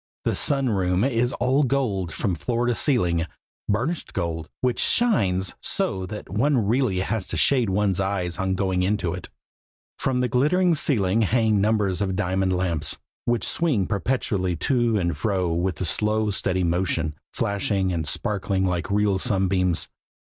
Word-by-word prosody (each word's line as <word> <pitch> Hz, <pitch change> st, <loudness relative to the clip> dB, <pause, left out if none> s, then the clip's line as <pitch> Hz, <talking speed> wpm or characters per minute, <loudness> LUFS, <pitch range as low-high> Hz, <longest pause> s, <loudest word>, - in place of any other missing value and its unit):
The -, -, +1 dB
Sun 135 Hz, -3 st, +1 dB
room 95 Hz, -2 st, +1 dB
is 125 Hz, -2 st, +1 dB
all 130 Hz, +4 st, +1 dB
gold 120 Hz, -, 0 dB
from 95 Hz, +4 st, -2 dB
floor 120 Hz, +8 st, -1 dB
to 120 Hz, -, +2 dB
ceiling, 90 Hz, -, +1 dB, 0.4 s
burnished 125 Hz, +11 st, -1 dB
gold, 80 Hz, -1 st, -3 dB
which 125 Hz, -1 st, 0 dB
shines 95 Hz, -, +2 dB
so 95 Hz, -1 st, 0 dB
that 105 Hz, +3 st, -7 dB
one 120 Hz, +2 st, +1 dB
really 110 Hz, -4 st, +1 dB
has 100 Hz, 0 st, -2 dB
to 80 Hz, -, -3 dB
shade 125 Hz, -, +3 dB
one's 95 Hz, -1 st, +1 dB
eyes 95 Hz, -3 st, -2 dB
on 95 Hz, -1 st, 0 dB
going 95 Hz, -1 st, 0 dB
into 90 Hz, -3 st, 0 dB
it. 90 Hz, -, -7 dB, 0.7 s
From 125 Hz, -1 st, 0 dB
the 125 Hz, -, +1 dB
glittering 165 Hz, +9 st, +2 dB
ceiling 115 Hz, -, +2 dB
hang 110 Hz, -1 st, +2 dB
numbers 105 Hz, -3 st, +1 dB
of 95 Hz, -2 st, -1 dB
diamond 95 Hz, +1 st, 0 dB
lamps, 85 Hz, -5 st, -1 dB, 0.3 s
which 120 Hz, -4 st, 0 dB
swing 145 Hz, -, +1 dB
perpetually 100 Hz, -3 st, -1 dB
to 120 Hz, -, +1 dB
and 85 Hz, -3 st, 0 dB
fro 95 Hz, -6 st, -1 dB
with 85 Hz, 0 st, -1 dB
a 95 Hz, -, -1 dB
slow, 105 Hz, +4 st, +1 dB
steady 95 Hz, -2 st, 0 dB
motion, 85 Hz, -2 st, 0 dB, 0.2 s
flashing 100 Hz, -2 st, -1 dB
and 80 Hz, -3 st, -2 dB
sparkling 100 Hz, +1 st, 0 dB
like 90 Hz, -1 st, -1 dB
real 100 Hz, -1 st, +2 dB
sunbeams. 95 Hz, -5 st, +1 dB
100 Hz, 155 wpm, -24 LUFS, 90-120 Hz, 0.7 s, shade